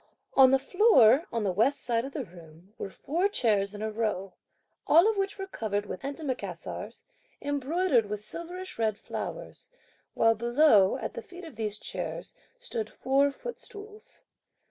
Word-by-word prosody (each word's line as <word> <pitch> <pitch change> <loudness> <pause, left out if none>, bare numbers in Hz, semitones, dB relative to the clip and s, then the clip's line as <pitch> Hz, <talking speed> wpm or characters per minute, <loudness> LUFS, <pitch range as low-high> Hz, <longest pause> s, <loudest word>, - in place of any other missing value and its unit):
On 265 -1 +7
the 270 - +5
floor 275 - +5
on 230 -2 -1
the 195 - +1
west 225 +10 +1
side 235 0 0
of 275 - -8
the 275 -5 -4
room, 170 +1 -16
were - - -4
four 340 - -1
chairs 210 - +1
in 205 - -6
a 220 - -2
row, 210 -4 -2 0.5
all 335 +6 +6
of 445 - +2
which 395 0 -2
were 390 - -4
covered 210 - -3
with 190 - -7
antimacassars, 280 -1 -5 0.4
embroidered 285 - +1
with 210 0 -4
silverish 350 - -8
red 215 -2 +1
flowers, - - -7 0.5
while 225 0 +4
below, 235 -3 +4
at - - -5
the - - -6
feet 355 0 -12
of 320 - -11
these 215 -1 -2
chairs, - - -5 0.2
stood 230 - -5
four 275 +2 +2
footstools. 440 - -10
260 Hz, 160 wpm, -28 LUFS, 215-345 Hz, 0.5 s, On